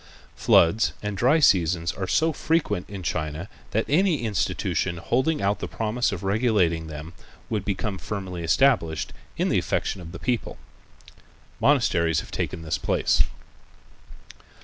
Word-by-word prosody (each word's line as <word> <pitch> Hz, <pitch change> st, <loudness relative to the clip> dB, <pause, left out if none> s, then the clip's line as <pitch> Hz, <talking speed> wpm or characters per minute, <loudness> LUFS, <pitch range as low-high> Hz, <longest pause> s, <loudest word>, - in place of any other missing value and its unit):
Floods 95 Hz, +7 st, +4 dB
and 105 Hz, -1 st, -3 dB
dry 125 Hz, +10 st, +4 dB
seasons 85 Hz, -, +3 dB
are 95 Hz, -, -4 dB
so 160 Hz, -, +2 dB
frequent 150 Hz, -, 0 dB
in 95 Hz, -2 st, -7 dB
China 75 Hz, +2 st, -3 dB, 0.2 s
that 110 Hz, -, 0 dB
any 160 Hz, -2 st, +2 dB
institution 95 Hz, -4 st, -1 dB
holding 130 Hz, -, 0 dB
out 100 Hz, +1 st, +1 dB
the -, -, -4 dB
promise 115 Hz, +2 st, -1 dB
of 100 Hz, -2 st, -5 dB
regulating 95 Hz, -6 st, +1 dB
them 80 Hz, +2 st, -8 dB, 0.4 s
would 110 Hz, -2 st, -1 dB
become 100 Hz, -1 st, -3 dB
firmly 95 Hz, -4 st, -5 dB
established 85 Hz, -, +2 dB, 0.2 s
in -, -, +1 dB
the -, -, +3 dB
affection 95 Hz, -, -2 dB
of 80 Hz, -1 st, -9 dB
the 90 Hz, -, -7 dB
people. 125 Hz, -2 st, -2 dB, 0.5 s
The -, -, -20 dB, 0.4 s
monasteries 85 Hz, -1 st, +3 dB
have -, -, -12 dB
taken 80 Hz, -, -3 dB
this 80 Hz, +2 st, -2 dB
place. -, -, +1 dB
100 Hz, 145 wpm, -25 LUFS, 85-120 Hz, 0.5 s, Floods